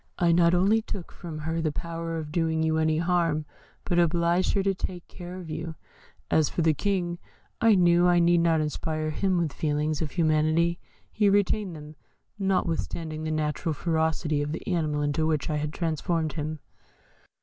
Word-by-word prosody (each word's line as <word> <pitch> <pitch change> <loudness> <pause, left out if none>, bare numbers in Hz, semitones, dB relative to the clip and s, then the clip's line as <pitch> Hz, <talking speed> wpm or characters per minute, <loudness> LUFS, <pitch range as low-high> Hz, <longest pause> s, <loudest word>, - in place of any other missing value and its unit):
I 175 -2 +3
not 170 +1 +4
only 200 +5 +3
took 195 -5 -7
from 165 -4 -8
her 160 +2 -2
the 155 -1 0
power 165 +1 -4
of 155 -2 -5
doing 160 -1 0
you 160 0 +1
any 155 0 +2
harm, 165 -3 +1 0.4
but 175 -2 +1
obliged 170 +1 +2
her 195 - +1
to 195 0 +2
take 180 -2 -5
care 180 0 -9
of 180 -3 -8
you. 160 +1 -5 0.6
As 155 -2 +3
for 170 - -1
the 160 -1 +4
King, 175 -1 -1 0.4
I 225 -2 +6
knew 175 -1 +4
I 175 0 +4
need 170 0 +4
not 165 -2 +3
inspire 155 +1 -2
him 185 +3 0
with 165 -4 0
feelings 150 0 -1
of 155 - -1
humanity; 160 +1 +2 0.3
he 210 -2 +3
retained 200 -2 +1
them, 150 0 -11 0.4
notwithstanding 165 -4 -1
the - - -2
natural 155 +1 -1
ferocity 160 -1 0
of 145 +1 -2
the - - -6
animal 155 -6 0
into 145 +2 0
which 155 -1 0
I 150 - 0
had 150 0 -2
transformed 160 -1 -1
him." 155 0 -4
165 Hz, 180 wpm, -27 LUFS, 155-175 Hz, 0.6 s, I